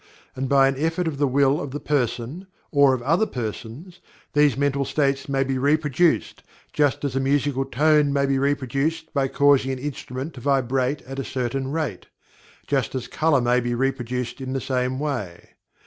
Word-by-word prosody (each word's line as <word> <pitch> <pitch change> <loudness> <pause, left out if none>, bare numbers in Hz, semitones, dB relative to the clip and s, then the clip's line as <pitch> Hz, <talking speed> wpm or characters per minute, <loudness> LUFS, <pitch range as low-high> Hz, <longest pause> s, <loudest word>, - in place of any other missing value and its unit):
And 130 0 -3
by 135 -1 +5
an 135 0 -1
effort 165 +3 0
of 145 -4 -3
the 145 - +3
will 140 +2 +2
of 140 - -5
the 145 +3 -5
person, 140 - -2 0.2
or 140 -3 +5
of 120 - -7
other 165 - +2
persons, 125 - -6 0.3
these 145 -3 +3
mental 140 0 +1
states 135 -1 0
may 135 -1 +1
be 135 -1 -2
reproduced, 150 +3 +1 0.3
just 145 -1 +1
as 135 -2 -2
a - - +2
musical 135 0 +1
tone 150 +2 +3
may 140 0 +2
be 135 -1 +1
reproduced 145 +4 -1
by 140 -3 +1
causing 140 -1 +3
an 130 - -3
instrument 135 +1 -5
to 125 - -10
vibrate 135 +1 0
at 135 +1 -7
a - - -2
certain 130 +1 -3
rate 150 - -3 0.6
just 135 -3 -1
as 125 -2 -3
color 155 -4 +2
may 120 +1 +3
be 120 0 -2
reproduced 125 -1 -2
in 130 0 -4
the 135 - -1
same 130 0 -1
may. 125 -12 -4
135 Hz, 180 wpm, -23 LUFS, 130-145 Hz, 0.6 s, by